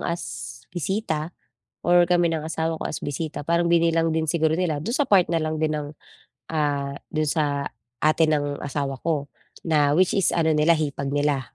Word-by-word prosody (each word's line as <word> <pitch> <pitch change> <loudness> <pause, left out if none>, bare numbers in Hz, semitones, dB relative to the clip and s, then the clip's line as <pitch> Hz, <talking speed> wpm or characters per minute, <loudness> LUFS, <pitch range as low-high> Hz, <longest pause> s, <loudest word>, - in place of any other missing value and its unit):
as 170 0 -3 0.5
bisita 175 -3 -2 0.5
or 175 0 +6
kami 175 0 +3
ng 155 -1 -2
asawa 160 0 -2
ko - - -7
as - - -4
bisita 145 0 -4
parang 170 0 +2
binilang 165 -1 +3
din 160 0 0
siguro 160 0 +2
nila 160 -5 -1
do'n 230 - -2
sa 290 - +2
part 185 -5 +4
na 165 - +2
lang 155 0 -2
din 155 - +1
ng, 145 -1 -4 0.7
ah, 145 -3 0 0.2
do'n 155 -1 -1
sa 145 -3 0 0.4
ate 155 +1 +4
ng 145 -2 0
asawa 140 -1 -3
ko 150 -4 -2 0.3
na 150 -3 +3
which 185 0 +4
is 195 -3 +2
ano 160 -2 +2
nila 155 +2 +4
hipag 140 -3 -2
nila 145 -1 -1
155 Hz, 180 wpm, -24 LUFS, 145-170 Hz, 0.7 s, or